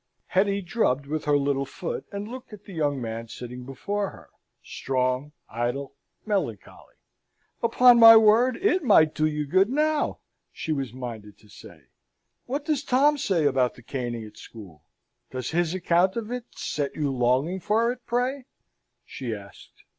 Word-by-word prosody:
Hetty 200 Hz, +1 st, +1 dB
drubbed 170 Hz, -, 0 dB
with 155 Hz, +2 st, -4 dB
her 145 Hz, -1 st, +3 dB
little 140 Hz, -1 st, 0 dB
foot, 175 Hz, -, -6 dB
and 200 Hz, +1 st, -5 dB
looked 250 Hz, +1 st, -9 dB
at 205 Hz, -1 st, -12 dB
the 195 Hz, -, -11 dB
young 145 Hz, -4 st, -1 dB
man 115 Hz, -1 st, -5 dB
sitting 125 Hz, +2 st, -8 dB
before 200 Hz, +9 st, -3 dB
her -, -, -16 dB, 0.3 s
strong, 130 Hz, +2 st, -2 dB, 0.2 s
idle, 120 Hz, +5 st, -3 dB, 0.3 s
melancholy. 185 Hz, -, -4 dB, 0.7 s
"Upon 240 Hz, +1 st, +6 dB
my 225 Hz, -1 st, +11 dB
word, 225 Hz, +3 st, +4 dB
it 375 Hz, -3 st, +1 dB
might 160 Hz, -, +5 dB
do 155 Hz, -, +1 dB
you 150 Hz, -1 st, -2 dB
good 185 Hz, +8 st, +3 dB
now!" 305 Hz, +3 st, 0 dB, 0.3 s
she 160 Hz, -, -5 dB
was 135 Hz, -6 st, -2 dB
minded 115 Hz, -5 st, -8 dB
to 105 Hz, -, -22 dB
say. -, -, -14 dB, 0.6 s
"What 280 Hz, +4 st, -3 dB
does 295 Hz, -3 st, 0 dB
Tom 285 Hz, +3 st, +3 dB
say 175 Hz, -, +1 dB
about 130 Hz, -3 st, +2 dB
the 120 Hz, -, -16 dB
caning 120 Hz, -3 st, -4 dB
at 105 Hz, -, -14 dB
school? 95 Hz, -10 st, -13 dB, 0.5 s
Does 130 Hz, -2 st, -5 dB
his 170 Hz, +1 st, 0 dB
account 180 Hz, +1 st, +2 dB
of 230 Hz, -1 st, -4 dB
it 250 Hz, -1 st, -4 dB
set 145 Hz, -2 st, -3 dB
you 145 Hz, -3 st, -1 dB
longing 130 Hz, +9 st, +1 dB
for 225 Hz, +6 st, +1 dB
it, 250 Hz, -, -7 dB
pray?" 250 Hz, +2 st, -1 dB, 0.6 s
she 120 Hz, -5 st, -5 dB
asked. 100 Hz, -1 st, -14 dB
155 Hz, 160 wpm, -25 LUFS, -, 0.7 s, my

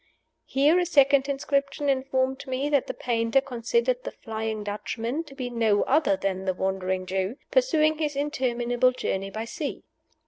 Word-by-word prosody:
Here 295 Hz, +6 st, +4 dB
a 355 Hz, -, +1 dB
second 280 Hz, -3 st, +4 dB
inscription 280 Hz, +1 st, -1 dB
informed 265 Hz, 0 st, 0 dB
me 260 Hz, +3 st, -1 dB
that 285 Hz, -3 st, +2 dB
the -, -, -3 dB
painter 230 Hz, +1 st, +1 dB
considered 245 Hz, -1 st, 0 dB
the -, -, -4 dB
Flying 220 Hz, -1 st, -4 dB
Dutchman 225 Hz, +7 st, -3 dB
to 275 Hz, -2 st, -13 dB
be 250 Hz, -3 st, -4 dB
no 225 Hz, -3 st, +2 dB
other 280 Hz, -8 st, +2 dB
than 190 Hz, -1 st, -2 dB
the 185 Hz, -1 st, 0 dB
Wandering 190 Hz, 0 st, -1 dB
Jew, 190 Hz, +4 st, -2 dB, 0.2 s
pursuing 315 Hz, -12 st, +3 dB
his 300 Hz, -2 st, -1 dB
interminable 255 Hz, -3 st, +1 dB
Journey 195 Hz, -5 st, -2 dB
by 220 Hz, +3 st, -5 dB
sea. 290 Hz, +4 st, -5 dB
255 Hz, 160 wpm, -26 LUFS, 220-280 Hz, 0.2 s, Here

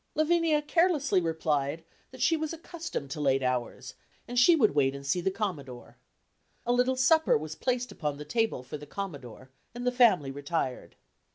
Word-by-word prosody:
Lavinia 310 Hz, -1 st, +2 dB
carelessly 295 Hz, -, +2 dB
replied, 160 Hz, -2 st, -1 dB, 0.3 s
that 260 Hz, -1 st, -5 dB
she 325 Hz, -, +4 dB
was 315 Hz, -1 st, -3 dB
accustomed 330 Hz, -, -6 dB
to 150 Hz, -, -4 dB
late 135 Hz, -2 st, +2 dB
hours, 125 Hz, -2 st, -3 dB, 0.3 s
and 245 Hz, 0 st, 0 dB
she 335 Hz, +7 st, +7 dB
would 225 Hz, -, +3 dB
wait 135 Hz, -2 st, +2 dB
and 140 Hz, 0 st, -9 dB
see 175 Hz, +6 st, 0 dB
the 190 Hz, -, +1 dB
Commodore. 145 Hz, -, -5 dB, 0.7 s
A 240 Hz, -, +2 dB
little 250 Hz, +1 st, +2 dB
supper 315 Hz, +5 st, +4 dB
was 155 Hz, +1 st, -6 dB
placed 250 Hz, +6 st, -2 dB
upon 150 Hz, -3 st, -3 dB
the 150 Hz, -, -8 dB
table 225 Hz, -, -1 dB
for 145 Hz, +3 st, -7 dB
the 150 Hz, -, -11 dB
Commodore, 135 Hz, -, -7 dB, 0.2 s
and 245 Hz, 0 st, -5 dB
the 250 Hz, -, +2 dB
family 215 Hz, -, +4 dB
retired. 140 Hz, -1 st, -4 dB
185 Hz, 175 wpm, -28 LUFS, -, 0.7 s, she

